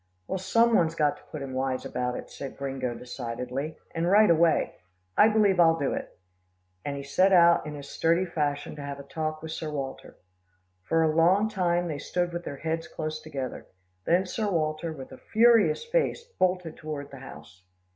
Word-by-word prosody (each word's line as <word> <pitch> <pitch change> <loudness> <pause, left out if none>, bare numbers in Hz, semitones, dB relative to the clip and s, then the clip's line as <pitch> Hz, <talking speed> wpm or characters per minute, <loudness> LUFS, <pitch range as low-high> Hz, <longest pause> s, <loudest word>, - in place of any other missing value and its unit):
"Well, 190 - -3
some 230 +5 +3
one's 165 -3 +2
got 150 -3 +1
to - - -20
put 150 -3 -6
him 135 -1 -6
wise 130 0 -2
about 125 0 -2
it," - - -8
said 140 - -8
Gringo 135 -3 -3
decidedly, 125 +4 -5 0.2
"and 165 +1 0
right 210 -1 +6
away. 165 -1 +2 0.4
I 210 - +7
believe 210 -4 +3
I'll 165 -1 +6
do 140 -4 -1
it," - - -6 0.7
and 140 0 -3
he 140 - -5
set 185 +8 +3
out 170 -3 +5
in 150 - -6
his 140 -1 -8
sturdy 170 +5 +1
fashion 150 -4 -2
to - - -6
have 140 0 -6
a - - -8
talk 155 +2 -4
with 160 - -6
Sir 160 -1 -4
Walter. 140 -3 -6 0.6
For 165 - +1
a 155 -1 +1
long 185 +6 +4
time, 175 -3 0
they 150 -3 -4
stood 175 +2 -2
with 175 0 -5
their 140 - -5
heads 165 +2 -3
close 155 0 -5
together, 135 -5 -6 0.4
then 180 +3 +3
Sir 210 +3 -2
Walter, 155 -2 -1
with 135 -4 -9
a - - -11
furious 225 - +4
face, 470 0 0
bolted 180 - -1
toward 150 -2 -6
the 135 - -10
house. 90 - -12
160 Hz, 195 wpm, -27 LUFS, 140-180 Hz, 0.7 s, I